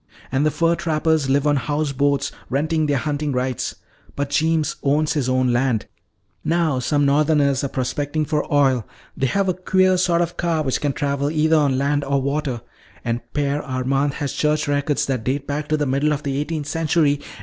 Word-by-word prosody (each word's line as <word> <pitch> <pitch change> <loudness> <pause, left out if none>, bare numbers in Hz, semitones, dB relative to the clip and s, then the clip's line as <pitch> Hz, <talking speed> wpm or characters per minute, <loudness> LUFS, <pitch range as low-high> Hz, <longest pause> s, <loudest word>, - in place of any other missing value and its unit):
"And 135 +2 +1
the 155 - +3
fur 165 +2 +2
trappers 160 -3 0
live 140 +1 +2
on 145 -1 +3
house 145 +4 -1
boats, 140 +1 +1 0.2
renting 155 +3 0
their 145 -1 +1
hunting 145 +1 -2
rights. 125 -1 -2 0.4
But 140 0 -3
Jeems 160 0 +1
owns 150 +2 +1
his 135 -4 -1
own 130 -1 +2
land. 120 -3 +1 0.6
Now 165 -5 +1
some 145 +3 +1
northerners 145 -1 +2
are - - +1
prospecting 145 +4 -2
for 150 0 -2
oil. 135 -5 +3 0.3
They 135 - 0
have 195 +8 0
a 185 - +2
queer 185 +1 +2
sort 175 -1 +2
of 170 0 -2
car 165 -3 0
which 130 -3 -1
can 145 -2 0
travel 140 0 -1
either 155 +1 +2
on 140 -3 +2
land 145 +1 +1
or 140 0 +1
water. 140 -3 -2 0.4
And 120 0 -1
Père 145 0 0
Armand 135 +1 -1
has 145 -2 -3
church 150 0 0
records 145 0 0
that 130 -4 -2
date 135 +3 -1
back 145 +1 -3
to 155 - +1
the 150 - 0
middle 140 +3 +1
of 150 0 -4
the 140 -2 -2
eighteenth 150 0 -3
century. 150 -2 +1
145 Hz, 195 wpm, -21 LUFS, 135-155 Hz, 0.6 s, the